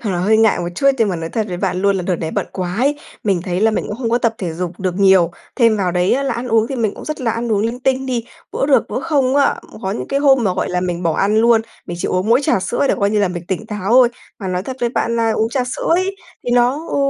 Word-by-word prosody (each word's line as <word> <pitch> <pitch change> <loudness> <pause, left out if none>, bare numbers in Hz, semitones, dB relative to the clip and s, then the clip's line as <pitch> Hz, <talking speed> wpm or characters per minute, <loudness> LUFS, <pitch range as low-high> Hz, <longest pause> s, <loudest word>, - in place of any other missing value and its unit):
Thật 210 - -2
là 175 - -1
hơi 210 +5 +3
ngại 220 -3 +3
một 175 0 -2
chút, 275 - 0
nhưng 225 -3 +3
mà 180 - -1
nói 165 0 -5
thật 220 -2 -1
với 180 - -4
bạn 185 -1 -2
luôn 200 -1 +3
là 185 - -2
đợt 180 0 -1
này 160 -1 -4
bận - - -2
quá 180 -1 -3
ấy, 285 +3 +1 0.3
mình 195 -4 +1
thấy 180 0 -2
là 220 +1 +4
mình 215 - -2
cũng 210 - -4
không 235 -3 -2
có 240 - +3
tập 230 -1 0
thể 175 -4 -3
dục 175 +2 -5
được 185 -2 -1
nhiều. 190 -3 +5 0.3
Thêm 230 -4 +4
vào 185 -3 0
đấy 180 +1 +2
á 275 - +1
là 275 - -1
ăn 245 +1 -4
uống 225 -1 +3
thì 270 - -4
mình 220 -4 0
cũng - - -10
rất 305 -1 -5
là 235 -3 0
ăn 230 0 -2
uống 200 - +2
linh 230 +4 -2
tinh 265 +1 0
đi, 240 -3 -2 0.3
bữa - - 0
được 280 -2 +3
bữa - - -3
không 280 -4 +1
á. 280 - +3 0.3
Có 190 - -2
những 210 - -4
cái 275 0 0
hôm 270 -4 +4
mà, 185 -3 +1
gọi - - -1
là, 180 0 -1
mình 180 -1 -3
bỏ 165 -2 +1
ăn 205 +2 +2
luôn, 230 0 +5 0.3
mình 175 - -5
chỉ - - -1
uống 185 +3 -1
mỗi 240 +4 +5
trà 195 - +2
sữa 240 +9 0
để - - +3
coi 200 0 +2
như 210 - +1
là 200 - +2
mình 175 -1 -6
tỉnh 195 +3 -3
táo 210 -1 -3
ôi. 250 -1 +7 0.3
Mà 190 - -4
nói 180 0 -2
thật 260 +3 -6
với 240 - +1
bạn 235 -1 -1
là 230 -1 +2
uống 220 +1 0
trà 250 +1 -1
sữa 250 - -4
ấy, 385 +2 -1 0.3
thì 245 - -2
nó 245 +6 +2
ừ, - - -2
220 Hz, 320 wpm, -18 LUFS, 185-245 Hz, 0.3 s, ôi